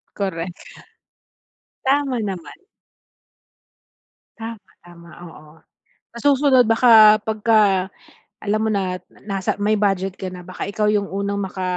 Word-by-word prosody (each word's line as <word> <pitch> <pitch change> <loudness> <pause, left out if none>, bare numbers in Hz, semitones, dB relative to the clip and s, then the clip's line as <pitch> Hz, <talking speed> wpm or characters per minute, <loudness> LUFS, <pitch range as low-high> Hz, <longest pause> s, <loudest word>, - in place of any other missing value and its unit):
Correct. 180 -3 -4 1.3
Tama 270 -2 +1
naman. 190 - -6 1.8
Tama, 225 -3 -8
tama, 170 -1 -16 0.2
oo. 150 -1 -16 0.6
Sa - - -8
susunod 270 -2 +4
baka 220 -2 +7
pagka 210 -3 +2 0.5
alam 210 +1 -1
mo 220 - 0
na, 190 -3 -1 0.3
nasa 195 0 -2
may 210 +1 +1
budget 195 -2 -1
ka 185 -1 -6
na 180 -1 -11
baka 185 - -6
ikaw 210 +1 -1
yung 205 -2 0
unang 200 +1 -2
maka 190 0 -5
200 Hz, 115 wpm, -20 LUFS, 185-220 Hz, 1.8 s, baka